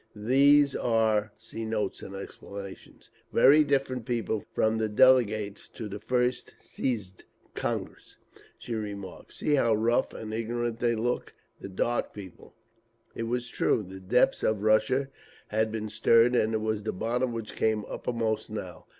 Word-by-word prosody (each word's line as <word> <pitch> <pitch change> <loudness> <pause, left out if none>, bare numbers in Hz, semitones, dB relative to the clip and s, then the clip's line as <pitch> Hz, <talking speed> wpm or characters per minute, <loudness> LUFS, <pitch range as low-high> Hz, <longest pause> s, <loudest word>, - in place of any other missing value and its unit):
"These 140 +6 +4
are 110 -2 +1 2.0
very 150 +3 +6
different 135 -4 -1
people 115 -3 -1
from 110 +1 +1
the 110 -1 0
delegates 110 -3 +3
to 115 - -7
the 105 0 -7
first 125 +3 -1
Siezd 105 -8 -4 0.3
(Congress)," - - -5 0.4
she 120 - -6
remarked. 100 -4 -6
"See 150 - -1
how 115 -6 +3
rough 115 +4 +1
and 110 -1 -6
ignorant 115 +1 -2
they 120 -1 +1
look! 120 +3 -2 0.2
The - - -8
Dark 120 +5 -1
People…." 95 -4 -11 0.6
It 115 - -4
was 125 +1 -2
true; 115 - +1
the 95 +1 -9
depths 105 +7 +2
of 105 -2 0
Russia 110 +6 +2 0.4
had 110 +1 0
been 110 -1 -3
stirred, 115 +3 +4
and 110 -1 +2
it 110 - -1
was 110 -1 -1
the 110 - -3
bottom 120 +6 -1
which 115 -2 -6
came 110 -1 0
uppermost 110 -3 -2
now. 95 -6 -7
110 Hz, 140 wpm, -28 LUFS, 105-125 Hz, 2.0 s, very